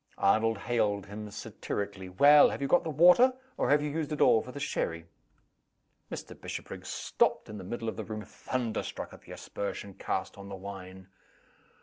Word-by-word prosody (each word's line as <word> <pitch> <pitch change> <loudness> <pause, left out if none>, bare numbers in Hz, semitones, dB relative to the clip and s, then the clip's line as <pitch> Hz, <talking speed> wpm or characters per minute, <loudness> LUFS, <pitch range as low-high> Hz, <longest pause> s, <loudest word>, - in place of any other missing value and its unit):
Arnold 110 +3 +3
hailed 105 -3 0
him 105 +1 -7
satirically. 100 -2 -5
"Well? 145 +10 +7
have - - -4
you 140 - -1
got 175 - +4
the 165 - -3
water? 180 - +6 0.2
or - - 0
have 145 +1 +4
you 150 - -1
used 155 0 -2
it 150 - -2
all 115 -3 +6
for 125 - -9
the 145 - -7
sherry?" 85 - -2 1.1
Mr. - - -6
Bishopriggs - - -6
stopped - - 0
in 105 -1 -7
the - - -7
middle 115 +4 -5
of 110 - -3
the 110 - -3
room, 110 +1 -5
thunder 120 -4 -3
struck - - -6
at - - -13
the - - -14
aspersion 100 0 -5
cast 100 - -3
on 100 0 -9
the 100 - -5
wine. 95 -1 -9
110 Hz, 190 wpm, -30 LUFS, 100-140 Hz, 1.1 s, Well